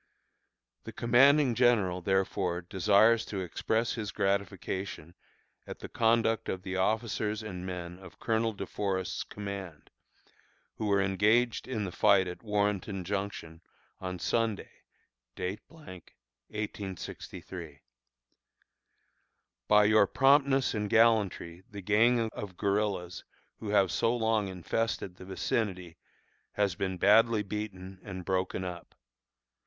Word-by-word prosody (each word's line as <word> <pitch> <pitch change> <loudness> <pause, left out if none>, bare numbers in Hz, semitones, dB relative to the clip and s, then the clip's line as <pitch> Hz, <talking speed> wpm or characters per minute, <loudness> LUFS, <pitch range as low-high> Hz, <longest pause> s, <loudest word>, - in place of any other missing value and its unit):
The - - -6
commanding 130 +3 +4
general, 110 -7 +2
therefore, 95 -1 0
desires 105 +6 +3
to 100 -2 -4
express 110 +5 -1
his 110 -3 -4
gratification 100 -4 -2 0.5
at - - -7
the - - -9
conduct 115 -1 +1
of 95 -1 -4
the 95 0 -4
officers 110 +2 -1
and 95 -3 -6
men 90 -1 -6
of 95 -2 -13
Colonel 115 0 0
De 100 - -5
Forest's 95 -6 -2
command, 100 -6 -8 0.9
who 110 - -2
were 100 -1 +3
engaged 110 +5 +2
in 115 -5 -2
the 95 - -4
fight 95 0 +4
at 90 - -7
Warrenton 105 -3 -1
Junction, 95 -4 -4 0.4
on 90 -1 -5
Sunday,, 115 +3 -1 0.7
1863. 95 - -8 1.9
By 105 0 +6
your 105 -1 +5
promptness 135 +1 +3
and 105 -2 -2
gallantry 105 -7 +2
the 100 -2 -8
gang 115 +4 +3
of 95 -5 -8
guerillas 100 -3 -1 0.4
who 110 - -6
have 100 -3 +3
so 115 +7 +1
long 110 -3 +1
infested 95 +1 -3
the 95 - -11
vicinity 95 -2 -2 0.6
has 100 -3 +1
been 95 +1 -3
badly 105 +3 +4
beaten 95 -2 -6
and 95 -2 -8
broken 95 -1 -1
up. 90 -1 -8
100 Hz, 115 wpm, -30 LUFS, 95-110 Hz, 1.9 s, By